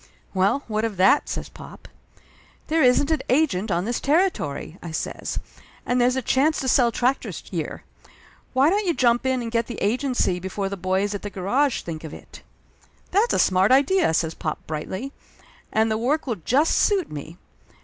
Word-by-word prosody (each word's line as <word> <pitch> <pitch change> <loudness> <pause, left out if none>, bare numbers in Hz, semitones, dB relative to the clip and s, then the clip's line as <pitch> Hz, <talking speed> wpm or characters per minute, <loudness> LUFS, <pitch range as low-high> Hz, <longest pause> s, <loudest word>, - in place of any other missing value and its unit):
"Well, 195 +9 +1
what 215 -1 -1
of 220 -4 -2
that?" 195 +10 +4
says - - -4
pop. - - -13 0.8
"There 320 +1 +2
isn't 265 +3 +4
an 315 - +1
agent 245 -8 +2
on 175 0 0
this 240 +2 -1
territory," 275 - 0
I 170 - -7
says. 160 - -4 0.5
"And 245 0 +1
there's 250 +1 +3
a 260 - -2
chance 290 +7 +2
to 265 - -3
sell 245 -2 +4
tractors 250 +4 -1
here. - - -4 0.7
Why 270 +5 +4
don't 410 0 0
you 340 - +1
jump 240 0 +2
in 260 -2 0
and 230 - -5
get 230 0 0
the 240 - -6
agency 240 -4 0
before 190 +2 -3
the 200 - -4
boys 190 +2 -1
at 200 - -4
the 205 - -5
garage 220 +9 0
think 160 -2 -6
of 160 - -7
it?" - - -13 0.7
"That's 420 +6 +2
a - - +2
smart 190 +3 +3
idea!" 285 - +4
says 160 0 0
pop 155 -1 -3
brightly. 185 - -5 0.6
"And 220 0 +2
the 220 - 0
work 285 +7 0
will 235 -6 -2
just 285 - +2
suit 395 -4 +2
me. 150 +3 -8
235 Hz, 185 wpm, -23 LUFS, 190-275 Hz, 0.8 s, that